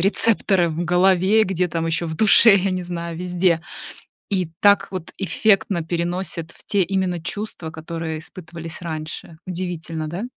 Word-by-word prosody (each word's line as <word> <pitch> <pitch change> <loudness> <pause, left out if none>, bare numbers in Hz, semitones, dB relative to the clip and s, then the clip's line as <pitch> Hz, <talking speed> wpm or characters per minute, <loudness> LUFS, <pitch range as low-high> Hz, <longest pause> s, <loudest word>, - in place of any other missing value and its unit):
рецепторы 195 -2 +3
в 165 +2 -3
голове, 185 +4 +4
где 185 -2 0
там 165 0 -2
еще 165 +1 -1
в 160 -1 -5
душе, 220 +1 +7
я 195 0 0
не 185 0 -2
знаю, 170 -1 -5
везде. 175 -1 +1 0.7
И 185 -4 0
так 205 0 +5
вот 185 -3 -6
эффектно 195 -2 +1
переносит 170 0 -3
в - - -13
те 200 -2 +2
именно 185 -1 -1
чувства, 200 -2 -4
которые 160 0 -5
испытывались 165 0 -9
раньше. 160 -1 -6
Удивительно, 170 -3 -4
да? 175 +8 -5
175 Hz, 150 wpm, -21 LUFS, 165-190 Hz, 0.7 s, душе